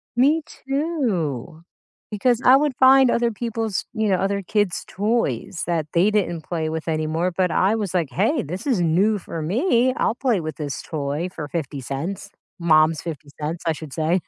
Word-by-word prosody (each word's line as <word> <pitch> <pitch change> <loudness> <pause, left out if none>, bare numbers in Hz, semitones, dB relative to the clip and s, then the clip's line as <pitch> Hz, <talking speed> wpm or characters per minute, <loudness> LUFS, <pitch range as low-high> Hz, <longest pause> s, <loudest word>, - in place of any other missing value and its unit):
Me 290 +6 +4
too, 220 - -2 0.5
because 240 +4 +1
I 255 +1 +8
would 290 -2 0
find 265 -1 +6
other 235 0 +1
people's, 225 -2 -3
you 220 -3 0
know, 190 - +4
other 200 +1 0
kids' 205 -1 0
toys 200 - -1
that 165 -3 0
they 180 +5 +4
didn't 185 -6 0
play 160 -1 -3
with 160 +1 -4
anymore, 160 +3 0
but 185 -2 +1
I 195 +6 +2
was, 205 -5 -3
like,"Hey, 185 - +1
this 180 +6 -6
is 245 -11 +1
new 190 +6 +2
for 165 -2 -6
me, 245 - +2
I'll 230 - +1
play 245 -7 +1
with 155 -2 -5
this 145 -3 -4
toy 150 +3 -3
for 150 -2 -5
50 140 -3 -4
cents," 165 +10 -5 0.3
Mom's 155 -1 +4
50 155 -3 -7
cents 155 +3 -4
I 160 - +3
should 150 -2 -9
say. 165 +3 +1
180 Hz, 175 wpm, -22 LUFS, 155-230 Hz, 0.5 s, I